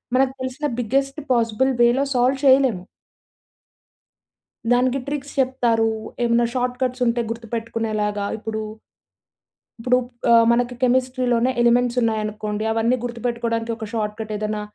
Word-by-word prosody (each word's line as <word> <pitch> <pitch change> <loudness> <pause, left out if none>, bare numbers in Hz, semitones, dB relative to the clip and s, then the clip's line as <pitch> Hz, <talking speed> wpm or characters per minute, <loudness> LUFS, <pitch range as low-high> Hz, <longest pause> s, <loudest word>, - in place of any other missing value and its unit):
మనకు 265 0 +3
తెలిసిన 260 +3 -4 0.2
biggest 275 +5 -1
possible 235 +3 +1
వేలో 245 +4 +3
సాల్వ్ 255 +2 +3
చేయలేము. 260 -9 +4 1.9
దానికి 250 +2 +2
ట్రిక్స్ 285 -1 -4
చెప్తారు. 235 -4 +1 0.3
ఏమైనా 235 0 +3
షార్ట్‌కట్స్ 250 0 -1
ఉంటే 235 +1 +1
గుర్తుపెట్టుకునేలాగా 225 -3 -3
ఇప్పుడూ 220 0 -4 1.2
ఇప్పుడు 250 +2 +3 0.3
ఆహ్, 230 -1 +6
మనకి 245 +1 0
కెమిస్ట్రీలోనే 255 -1 +2
ఎలిమెంట్స్ 245 +1 +3
ఉన్నాయనుకోండి. 215 -1 -2
అవన్నీ 225 +3 +1
గుర్తుపెట్టుకోవడానికి 235 -1 -2
ఒక 220 - -6
షార్ట్‌కట్ 215 0 -3
ఏదైనా 215 0 -3
235 Hz, 105 wpm, -22 LUFS, 225-255 Hz, 1.9 s, ఆహ్